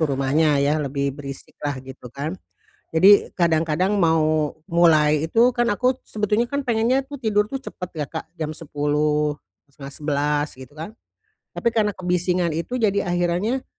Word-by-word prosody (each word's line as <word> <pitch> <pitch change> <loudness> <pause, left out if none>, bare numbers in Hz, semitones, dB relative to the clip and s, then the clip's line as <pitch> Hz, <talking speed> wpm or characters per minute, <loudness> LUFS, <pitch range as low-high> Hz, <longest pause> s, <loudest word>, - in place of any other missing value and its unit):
tuh 155 -3 +1
rumahnya, 145 +2 +2
ya, 145 +2 +2
lebih 140 -1 -2
berisik 140 -2 -9
lah, 145 -2 -2
gitu 130 -1 -10
kan. 150 +7 -4 0.6
Jadi, 195 +5 +6
kadang-kadang 170 +3 +1
mau 155 -3 +2 0.2
mulai 155 -3 +4
itu, 230 +9 +4
kan 240 0 +1
aku 250 +5 +1
sebetulnya 210 +2 0
kan, 280 0 -1
pengennya 245 +2 +1
tuh 285 0 -8
tidur 210 -4 +1
cepat 260 -9 -6
ya, 150 -2 -3
Kak. 160 +3 -6
Jam 155 -1 -3
10:00, 150 0 0 0.4
10:30, 145 +1 -2
gitu 130 +1 -13
kan. 165 +8 -7 0.6
Tapi 235 - +1
karena 210 -2 +1
kebisingan 180 -1 0
itu, 170 +10 -3
jadi 200 -6 +1
akhirannya, 175 +9 0
165 Hz, 150 wpm, -22 LUFS, 150-210 Hz, 0.6 s, Jadi